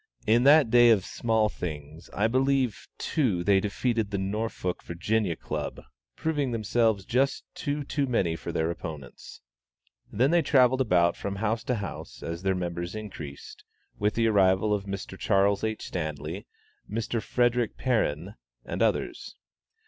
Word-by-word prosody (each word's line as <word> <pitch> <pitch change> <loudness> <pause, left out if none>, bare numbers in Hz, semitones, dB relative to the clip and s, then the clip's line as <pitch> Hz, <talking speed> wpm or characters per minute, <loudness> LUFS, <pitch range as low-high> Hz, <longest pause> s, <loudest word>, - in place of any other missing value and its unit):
In 120 +4 +4
that 145 -4 +6
day 120 0 +7
of 105 -5 +4
small 110 -2 +1
things, 80 -5 -7
I 105 - 0
believe, 130 0 +1
too, 110 - 0
they 100 +1 +4
defeated 110 +2 -1
the 100 - -2
Norfolk 100 -1 -3
(Va.) 95 +1 -1
Club, - - -5 0.4
proving 150 -4 -1
themselves 110 -3 +1
just 135 +3 +1
two 145 0 -3
too 140 0 -1
many 95 -9 +1
for 80 - -6
their 80 +1 0
opponents. 75 -6 -9 0.7
Then 130 +7 +2
they 170 0 +4
travelled 130 -3 +4
about 85 -7 +3
from 100 0 -4
house 110 +2 -1
to 125 - 0
house, 100 -2 -7
as 85 +1 -4
their 95 0 +1
members 85 +1 -4
increased, 80 -10 -8 0.4
with 105 +1 +1
the 115 - +2
arrival 100 -1 +3
of 100 -1 -2
Mr. 100 -1 -6
Charles 100 -1 +2
H. 110 0 -2
Stanley, 80 -4 -5 0.4
Mr. 115 +1 -2
Frederick 120 -2 +1
Perrin, 100 - 0 0.3
and - - -4
others. - - -1
105 Hz, 150 wpm, -27 LUFS, 90-120 Hz, 0.7 s, day